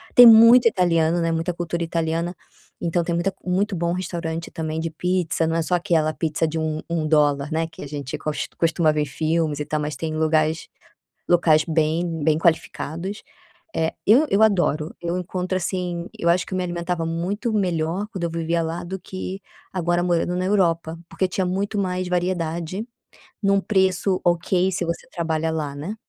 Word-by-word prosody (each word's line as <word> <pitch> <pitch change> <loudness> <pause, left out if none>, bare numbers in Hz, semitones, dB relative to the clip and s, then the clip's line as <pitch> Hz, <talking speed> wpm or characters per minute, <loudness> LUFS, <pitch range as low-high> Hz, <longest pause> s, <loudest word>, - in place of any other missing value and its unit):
tem 245 - +11
muito 230 +2 +8
italiano, 170 -4 +2
né, 165 0 +1
muita 165 +2 -1
cultura 170 0 -3
italiana, 165 +1 -2 0.5
então 170 0 0
tem 170 - -2
muita 180 +3 0
muito 190 +3 0
bom 170 0 -1
restaurante 170 -2 -4
também 160 0 -3
de 165 +1 -2
pizza 175 0 0
não 165 - 0
é 165 - +1
só 180 - +1
aquela 165 -4 +1
pizza 160 0 -1
de 160 +1 -3
1- 155 -1 -2
1 165 -2 -1
dólar, 145 -1 +2
né, 160 +1 0
que 165 - -11
a 145 - -7
gente 140 -3 -5
cos 155 -1 -3
costuma 165 -1 +2
ver 150 - 0
em - - 0
filmes 155 +1 -1
e 150 - -2
tal 155 0 -2
mas 150 0 -3
tem 160 -1 -3
lugares, 155 0 +1 0.6
locais 160 -3 +4
bem 160 +1 0
bem 155 -1 +3
qualificados. 170 +3 -1 0.5
Eh, 160 0 0
eu 245 +9 +6
eu 200 - +3
adoro 175 -7 +2
eu 170 +1 -2
encontro, 185 +1 -3
assim 175 -1 -3
eu 170 - 0
acho 175 +1 +3
que - - -7
eu - - 0
me 185 - 0
alimentava 175 -1 -2
muito 185 +8 -2
melhor 180 -1 0
quando 190 -5 -6
eu 170 - 0
vivia 165 0 -1
lá 165 +1 -4
do 190 +2 -5
que 185 +1 -6 0.3
agora 175 -1 +1
morando 175 0 0
na 185 - -1
Europa, 170 -4 +1
porque 190 - 0
tinha 185 +1 -1
muito 195 +3 -2
mais 185 -2 -1
variedade, 175 +2 -2 0.6
num 200 0 +4
preço 190 -2 +1
ok 175 +2 +2
se 180 - -2
você 170 0 -4
trabalha 160 -2 -1
lá, 150 -3 -3
né? 160 +9 -5
170 Hz, 185 wpm, -23 LUFS, 160-185 Hz, 0.6 s, tem